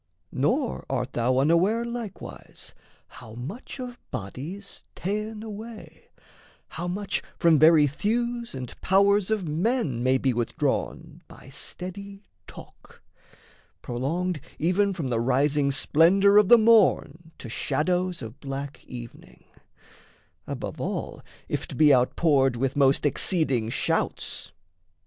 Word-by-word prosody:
Nor 240 - 0
art 130 -1 -2
thou 125 +2 +1
unaware 175 - +3
Likewise 235 -4 -8 0.3
how 120 -4 -13
much 150 - -8
of 245 -1 -7
body's 150 - -7
ta'en 210 +3 -4
away, 220 +1 -10 0.6
How 175 +2 -5
much 195 +3 -2 0.2
from 165 -3 +4
very 155 0 +7
thews 235 - -2
and 130 -2 -6
powers 200 +1 +3
of 210 -5 -1
men 160 - 0
May 130 +1 +3
be 130 -1 0
withdrawn 120 0 -2
by - - -14
steady 200 +2 -8 0.2
talk, - - -15 0.8
prolonged 155 +7 -2 0.2
Even 190 +5 +2
from 165 -9 -4
the 120 -2 0
rising 140 +4 +2
splendour 185 +8 +4
of 210 - +2
the 240 - +9
morn 205 -7 +3
To - - -9
shadows 180 +7 -1
of 115 +5 -9
black 140 0 -6
evening, 120 -2 -11 1.0
above - - -5
all - - -4 0.3
If - - -3
't - - -8
be 150 -2 +6
outpoured 135 +1 +3
with 130 +3 -1
most 140 0 +3
exceeding 140 - +1
shouts. - - -2
165 Hz, 120 wpm, -26 LUFS, 135-200 Hz, 1.0 s, the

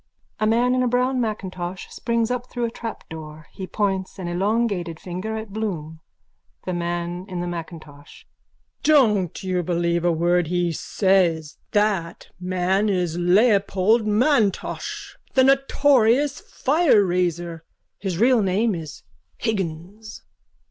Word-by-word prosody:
_ - - -47 0.4
(A 215 - +2
man 240 +3 +3
in 255 - +2
a 250 - +2
brown 250 +1 +1
macintosh 185 -5 -4
springs 235 0 -1
up 250 0 -3
through 240 -1 -2
a 230 - -3
trapdoor. 160 -9 -8
He 190 - -7
points 195 -2 -2
an 185 -2 -5
elongated 190 -2 -1
finger 190 +5 -5
at 220 -2 -7
Bloom.) 165 -8 -4 0.7
THE 185 - -2
MAN 175 +1 -3
IN 180 -1 -4
THE 175 - -2
MACINTOSH: 160 -4 -9 0.6
Don't 210 - +3
you 185 -1 0
believe 170 0 0
a 175 - +3
word 175 +1 +2
he 175 0 0
says. 170 -3 +1 0.2
That 205 -6 0
man 185 +3 0
is 180 -4 0
Leopold 200 +3 +3
M'Intosh, 215 -1 0 0.2
the 260 - +6
notorious 275 0 +3
fireraiser. 180 - +1 0.4
His 190 -4 -3
real 240 +3 +4
name 205 +3 +1
is 160 -5 -7 0.3
Higgins. 200 0 -4
190 Hz, 130 wpm, -23 LUFS, 175-225 Hz, 0.7 s, the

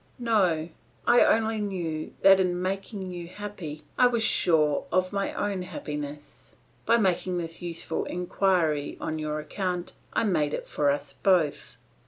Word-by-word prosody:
No; 185 -9 +1 0.4
I 240 - +6
only 220 0 +2
knew 175 -6 -3
that 195 0 +8
in 180 -1 +1
making 190 +1 -3
you 175 -1 -6
happy, 185 -6 -7 0.2
I 250 - +7
was 235 -2 0
sure 155 -8 +3
of 185 +1 +1
my 200 0 -1
own 200 -2 -1
happiness. 150 -4 -7 0.3
By 235 - +5
making 185 -3 +1
this 165 0 -5
useful 170 -1 -3
inquiry 175 -4 0
on 160 -1 -3
your 155 0 -2
account, 180 +3 -3 0.2
I - - +1
made 155 -8 +1
it - - -6
for 145 -1 +1
us 140 0 -1
both. 175 -6 +1
180 Hz, 150 wpm, -27 LUFS, 155-195 Hz, 0.4 s, that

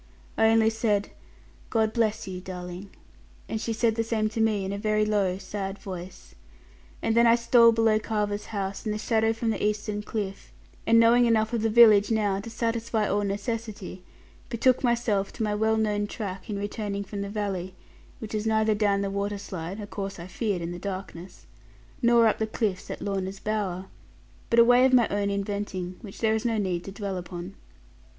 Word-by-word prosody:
I 220 - +4
only 225 0 +4
said, 215 -2 0 0.6
'God 220 -1 +1
bless 220 -4 0
you, 185 -1 -6
darling!' 180 +1 -7 0.6
and 220 - -3
she 230 - -2
said 225 0 +1
the 225 +1 0
same 220 -1 0
to 225 +1 -2
me, 215 -3 +1
in 195 - -3
a - - -3
very 215 0 +1
low 200 -3 +1
sad 195 0 -5
voice. 185 -2 -9 0.7
And 225 - +1
then 235 0 +6
I 230 - +6
stole 235 0 +6
below 225 -1 +3
Carver's 210 -1 -2
house, 195 -2 -4
in 215 - -2
the 210 - -2
shadow 225 0 +1
from 225 0 -1
the - - -3
eastern 210 0 -1
cliff; 205 -2 -5 0.4
and 230 0 +6
knowing 235 +1 +5
enough 220 0 +2
of 230 - 0
the 225 - +1
village 215 -3 +7
now 210 -3 +1
to 205 - -7
satisfy 230 -1 -1
all 205 +1 +1
necessity, 205 -2 -4 0.5
betook 250 +2 +2
myself 235 -5 +1
to - - -3
my 210 -1 0
well 220 +1 +1
known 210 -1 0
track 195 -3 -6
in 205 - -2
returning 205 0 -3
from 200 0 -6
the 200 - -4
valley; 195 -3 -3 0.4
which 220 -1 -8
was 215 0 -1
neither 220 0 +3
down 205 -1 +1
the 200 -1 -2
waterslide 200 -2 -4
(a 210 - -5
course 195 -1 -5
I 170 - -7
feared 185 -1 -2
in 170 - -4
the 175 - -6
darkness) 185 -2 -7 0.6
nor 235 -1 +5
up 220 - +2
the 220 - 0
cliffs 210 -4 -2
at - - -6
Lorna's 195 -1 -3
bower; 195 -4 -2 0.6
but 230 - +2
a 235 - +8
way 245 +1 +6
of 260 0 +4
my 240 -3 +6
own 200 0 0
inventing, 200 -2 -3
which 200 -3 -10
there 220 -1 +3
is 220 - -1
no 230 -2 0
need 185 -4 -1
to 195 - -6
dwell 195 -1 -4
upon. 180 +1 -7
210 Hz, 195 wpm, -26 LUFS, 195-225 Hz, 0.7 s, a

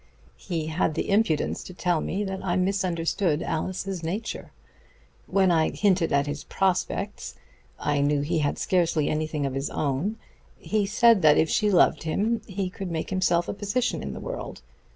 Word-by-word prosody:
He 165 -4 -3
had 160 0 0
the - - -2
impudence 200 -7 +1
to 185 - -10
tell 175 -3 0
me 200 +4 -2
that 190 -1 -4
I 175 -2 0
misunderstood 180 -3 0
Alice's 185 +2 -3
nature. 195 +8 -4 0.8
When 190 -2 +3
I 160 -2 +3
hinted 190 -5 +1
at 140 0 +3
his 145 0 -5
prospects 185 - -1 0.4
I 145 -1 0
knew 145 0 +2
he 160 +3 0
had 145 -1 0
scarcely 170 -6 +1
anything 155 -1 -1
of 135 - -2
his 135 +1 -2
own 155 +10 -1 0.4
he 210 -2 -1
said 230 0 +5
that 150 -2 +6
if 160 - +2
she 210 - +2
loved 180 -4 +4
him 215 +8 0
he 195 -1 -2
could 185 0 -6
make 160 +1 -3
himself 175 -2 +2
a - - -2
position 205 +5 -1
in - - -5
the - - -7
world. - - -6
180 Hz, 175 wpm, -26 LUFS, 155-195 Hz, 0.8 s, that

